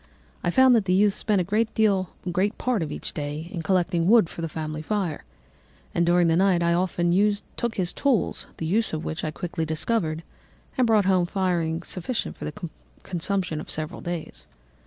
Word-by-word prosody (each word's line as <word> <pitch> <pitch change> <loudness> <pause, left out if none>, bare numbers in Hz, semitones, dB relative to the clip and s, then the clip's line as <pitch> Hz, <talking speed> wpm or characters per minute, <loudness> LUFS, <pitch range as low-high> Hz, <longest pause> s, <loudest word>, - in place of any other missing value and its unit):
I 175 - +1
found 260 +7 +6
that 225 -4 +3
the 185 0 +2
youth 205 +1 +4
spent 205 -2 +2
a - - 0
great 200 -2 0
part 250 -6 0
of 155 -2 -3
each - - -5
day 150 +2 -4
in 175 - -4
collecting 175 -1 +1
wood 220 -5 +6
for - - -7
the 165 - -2
family 155 -1 -4
fire, 185 -3 -2 0.7
and 170 0 +1
during 175 0 +4
the 165 - +3
night 185 -1 +3
I 170 0 +3
often 175 -1 +1 0.4
took 235 -1 -2
his 180 -2 -1
tools, 255 - 0
the 160 - -4
use 215 +6 +1
of 155 0 -3
which 160 - -4
I 155 - -1
quickly 160 +3 -4
discovered, 160 0 -1 0.5
and 255 -3 +3
brought 215 -3 +4
home 185 -2 +3
firing 175 -3 0
sufficient 190 +9 -3
for - - -7
the 170 +4 -5 0.4
consumption 180 -3 -2
of - - -11
several 155 +2 -2
days. 175 -2 -6
175 Hz, 185 wpm, -25 LUFS, 165-200 Hz, 0.7 s, found